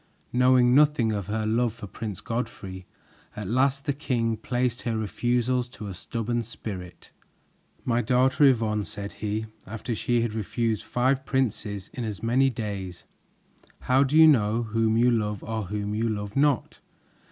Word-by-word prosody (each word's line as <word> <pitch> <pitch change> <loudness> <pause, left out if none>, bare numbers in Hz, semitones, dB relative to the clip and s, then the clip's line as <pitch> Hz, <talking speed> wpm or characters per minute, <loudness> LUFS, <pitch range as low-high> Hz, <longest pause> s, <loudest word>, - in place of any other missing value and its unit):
Knowing 125 0 +5
nothing 145 -5 +4
of 100 -3 -3
her 110 +1 -1
love 115 +1 +1
for 115 - -8
Prince 105 0 -6
Godfrey, 100 -6 -5 0.5
at 105 -2 -5
last 135 - +1
the 145 - +1
king 120 -5 -1
placed 125 +2 -1
her 115 -2 -2
refusals 120 +3 0
to 110 -4 -9
a 100 - -5
stubborn 115 +5 -2
spirit. 105 -5 -8 0.7
"My 120 0 +2
daughter, 130 +4 +3
Yvonne," 110 -5 +3
said 100 0 -6
he, 105 +1 -3 0.2
after 110 +3 -4
she 120 +2 +1
had 115 -2 -1
refused 110 +1 -1
five 130 +4 +1
princes 105 -7 -2
in 125 - -4
as 105 -2 -5
many 130 +4 +3
days, 100 -7 -5 0.8
"how 130 +2 +3
do 140 +3 +1
you 160 - +9
know 115 -6 +4
whom 110 0 +1
you 120 +1 +4
love 105 -3 -1
or 110 -1 -3
whom 105 +2 -3
you 115 +2 0
love 105 -1 -4
not? 140 -3 +1
115 Hz, 160 wpm, -26 LUFS, 105-125 Hz, 0.8 s, you